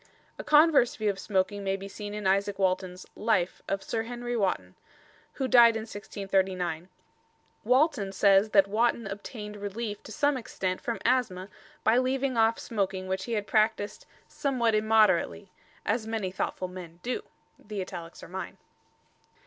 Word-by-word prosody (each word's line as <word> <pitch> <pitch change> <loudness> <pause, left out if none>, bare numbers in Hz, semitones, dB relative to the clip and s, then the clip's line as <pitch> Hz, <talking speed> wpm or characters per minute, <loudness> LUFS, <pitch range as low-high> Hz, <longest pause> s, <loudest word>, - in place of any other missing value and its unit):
A - - -4
converse 300 -5 +5
view 215 -2 +1
of 195 - -9
smoking 200 0 -1
may 195 0 0
be 195 0 -7
seen 205 +1 -7
in 210 - -5
Izaak 200 +1 +1
Walton's 185 -1 -1
"Life" 205 -5 0
of 195 0 -2
Sir 225 - -2
Henry 240 +1 -4
Wotton, 185 - -1 0.6
who 265 - -2
died 235 -2 +7
in 220 - -2
1639. 190 -5 -2 0.7
Walton 255 -4 +2
says 195 +2 +4
that 195 -2 +5
Wotton 230 +2 +1
obtained 210 +1 -7
relief 205 +1 -5
to - - -11
some 285 +5 +1
extent 185 -6 -3
from 235 - -2
asthma 215 -7 +1 0.3
by 225 +3 +4
leaving 260 0 0
off 225 0 +3
smoking 195 -4 -2
which 190 0 -2
he 235 - -4
had 210 -2 -1
practised 215 -1 0 0.2
"somewhat 250 -5 0
immoderately" 215 -3 +2 0.3
"as 220 +1 0
many 220 -5 -2
thoughtful 185 0 -3
men 175 -2 -10
do." 250 - -2 0.4
The 210 -1 -7
italics 170 -2 -8
are - - -9
mine. 190 +2 -6
205 Hz, 155 wpm, -28 LUFS, 190-230 Hz, 0.7 s, died